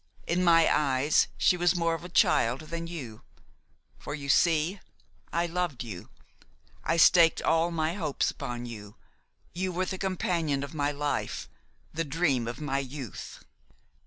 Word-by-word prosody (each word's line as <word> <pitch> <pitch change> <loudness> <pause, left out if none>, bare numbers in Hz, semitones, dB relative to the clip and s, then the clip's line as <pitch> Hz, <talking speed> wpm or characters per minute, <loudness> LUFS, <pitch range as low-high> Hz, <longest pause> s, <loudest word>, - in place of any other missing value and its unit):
In 175 +2 0
my 165 -2 +5
eyes 140 0 +2
she - - +4
was 175 +1 +2
more 170 -1 +1
of 165 - -5
a 180 - -8
child 125 -6 +3
than 165 +2 -6
you; 130 -11 -7 0.8
for, 145 - -5
you 140 -2 -7
see, 165 +5 +3 0.5
I 170 +1 +1
loved 175 -6 -2
you. 100 -7 -8 0.7
I 165 - 0
staked 165 0 +6
all 165 +1 +2
my 160 -1 -1
hopes 160 -7 -1
upon 120 0 -6
you; 105 -3 -9 0.6
you 185 +1 -2
were 180 +1 -1
the 190 0 -5
companion 170 -7 -1
of 140 - -7
my 145 -1 0
life, 145 0 -3 0.5
the 165 +1 -1
dream 145 -6 0
of 120 - -5
my 140 -2 -1
youth. 135 -4 -8
160 Hz, 155 wpm, -28 LUFS, 135-170 Hz, 0.8 s, staked